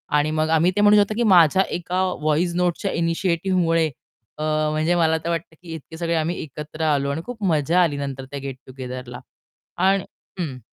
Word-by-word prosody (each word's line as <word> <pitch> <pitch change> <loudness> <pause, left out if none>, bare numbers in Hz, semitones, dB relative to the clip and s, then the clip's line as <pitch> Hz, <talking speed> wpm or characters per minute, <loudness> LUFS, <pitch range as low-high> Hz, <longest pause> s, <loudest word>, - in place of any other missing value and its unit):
आणि 150 +1 +2
मग 155 0 0
आम्ही 170 +4 +3
ते 205 - +2
म्हणू 210 0 +6
शकतो 205 +1 +3
की 240 - +1
माझ्या 175 +2 +6
एका 180 +2 -2 0.2
व्हॉइस 155 +3 +1
नोट्सच्या 180 +2 0
इनिशिएटिव्हमुळे 165 -1 +1 0.5
अ, 155 - -4 0.3
म्हणजे 155 +3 +1
मला 160 -1 +3
तर - - -1
वाटतं 165 -1 -3
की 165 -2 -9
इतके 160 +1 -9
सगळे 170 0 -1
आम्ही 160 +2 0
एकत्र 150 +2 -8
आलो 140 -2 +1
आणि 160 +3 -3
खूप 235 -4 -7
मजा 170 0 +2
आली 145 -4 0
नंतर 135 -2 -5
त्या 140 - -5
गेट 135 -1 -6
टुगेदरला 125 -1 -7 0.6
आणि 190 +1 +3 0.4
हं 140 -7 -3
165 Hz, 185 wpm, -22 LUFS, 150-180 Hz, 0.6 s, म्हणू